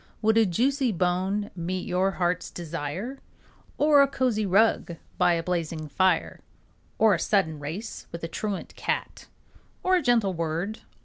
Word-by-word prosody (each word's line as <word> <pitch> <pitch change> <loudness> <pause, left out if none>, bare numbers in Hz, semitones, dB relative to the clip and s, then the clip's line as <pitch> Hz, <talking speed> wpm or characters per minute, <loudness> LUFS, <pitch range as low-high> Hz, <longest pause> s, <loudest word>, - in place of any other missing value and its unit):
Would 220 +1 +4
a 225 -2 +5
juicy 260 - +1
bone 185 +3 0
meet 180 +1 -3
your 185 +2 +2
heart's 180 -1 -1
desire? 170 - -5 0.6
Or 295 -1 +6
a 280 - +5
cozy 250 -6 0
rug 195 -3 +3 0.2
by 175 - +4
a 165 -1 -1
blazing 165 -3 -2
fire? 185 +4 +1 0.6
Or 220 -2 +5
a 170 - 0
sudden 160 -8 +1
race 170 +10 -6
with 170 - -7
a - - -1
truant 200 +3 -4
cat? - - -3 0.6
Or 370 0 +4
a 360 - +2
gentle 230 -8 +2
word? 170 +6 -3
190 Hz, 150 wpm, -26 LUFS, 170-220 Hz, 0.6 s, Or